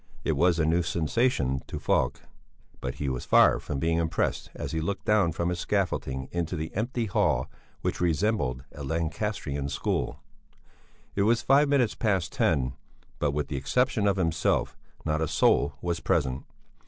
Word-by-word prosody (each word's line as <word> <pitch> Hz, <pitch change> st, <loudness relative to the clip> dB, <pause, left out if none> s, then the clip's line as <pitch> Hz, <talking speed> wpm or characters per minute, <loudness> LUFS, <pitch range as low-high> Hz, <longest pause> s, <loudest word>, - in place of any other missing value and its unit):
It -, -, +1 dB
was 85 Hz, -1 st, +3 dB
a 80 Hz, -, +2 dB
new 85 Hz, +3 st, +3 dB
sensation 80 Hz, -, 0 dB
to -, -, -5 dB
Falk; -, -, 0 dB, 0.6 s
but -, -, -4 dB
he 70 Hz, -, -3 dB
was 65 Hz, -2 st, -2 dB
far -, -, +5 dB
from 70 Hz, -, -4 dB
being 80 Hz, +3 st, +1 dB
impressed 80 Hz, -1 st, -1 dB
as -, -, -5 dB
he 80 Hz, -, -1 dB
looked 95 Hz, +5 st, -3 dB
down 105 Hz, -5 st, +3 dB
from 85 Hz, +2 st, -1 dB
his 90 Hz, -1 st, -2 dB
scaffolding 75 Hz, -10 st, -1 dB
into 85 Hz, 0 st, -2 dB
the 80 Hz, 0 st, -4 dB
empty 120 Hz, +3 st, -1 dB
hall 65 Hz, -, +1 dB, 0.3 s
which -, -, -2 dB
resembled 85 Hz, -, +1 dB
a 70 Hz, -, -8 dB
Lancastrian 80 Hz, -1 st, -2 dB
school. -, -, -2 dB, 0.9 s
It 100 Hz, -, 0 dB
was 115 Hz, +3 st, +3 dB
five 140 Hz, +2 st, +4 dB
minutes 130 Hz, -6 st, +3 dB
past 95 Hz, -7 st, 0 dB
ten, 65 Hz, -1 st, +1 dB, 0.5 s
but 75 Hz, -, +1 dB
with 70 Hz, 0 st, -1 dB
the 70 Hz, -, -3 dB
exception 105 Hz, -, +1 dB
of 100 Hz, -, +3 dB
himself, 80 Hz, -3 st, +1 dB, 0.3 s
not 80 Hz, 0 st, 0 dB
a 80 Hz, -, +1 dB
soul -, -, +3 dB
was 85 Hz, -1 st, -1 dB
present. 65 Hz, -4 st, 0 dB
85 Hz, 165 wpm, -27 LUFS, 70-100 Hz, 0.9 s, far